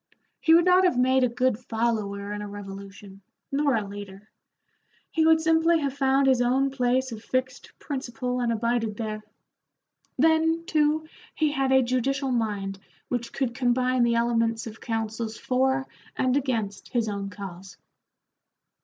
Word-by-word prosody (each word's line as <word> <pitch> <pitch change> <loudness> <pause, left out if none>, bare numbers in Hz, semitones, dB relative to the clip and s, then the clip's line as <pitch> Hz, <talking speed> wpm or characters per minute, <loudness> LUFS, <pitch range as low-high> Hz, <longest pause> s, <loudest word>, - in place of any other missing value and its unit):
He 325 0 +5
would 340 +1 +5
not 365 +1 +5
have 360 -9 +3
made 260 +1 +3
a 250 - +3
good 245 -1 0
follower 215 -4 -2
in 210 - -5
a 210 - -5
revolution, 195 0 -10 0.3
nor 280 -1 +2
a 210 -3 -1
leader. 200 0 -10 0.8
He 320 -1 +2
would 320 0 +6
simply 325 +1 +3
have 280 -2 -1
found 270 0 +2
his 260 -2 +4
own 265 +3 +2
place 260 0 0
of 220 -1 -8
fixed 255 +1 -3
principle 250 -2 -4
and 240 -1 0
abided 230 -1 -1
there. 215 -2 -4 1.0
Then, 325 +3 +3
too, 310 0 +1 0.3
he 305 -2 +1
had 270 -2 0
a 265 0 +5
judicial 265 +2 0
mind 205 -5 -2 0.3
which 240 -2 -3
could 260 -3 -2
combine 250 0 +1
the 235 -1 +3
elements 230 -1 +1
of 225 -1 -9
counsels 225 -1 -3
for 265 +1 +1 0.3
and 255 0 +1
against 230 -8 -2
his 235 -3 +1
own 200 -1 -3
cause. 195 -2 -9
245 Hz, 155 wpm, -26 LUFS, 220-270 Hz, 1.0 s, would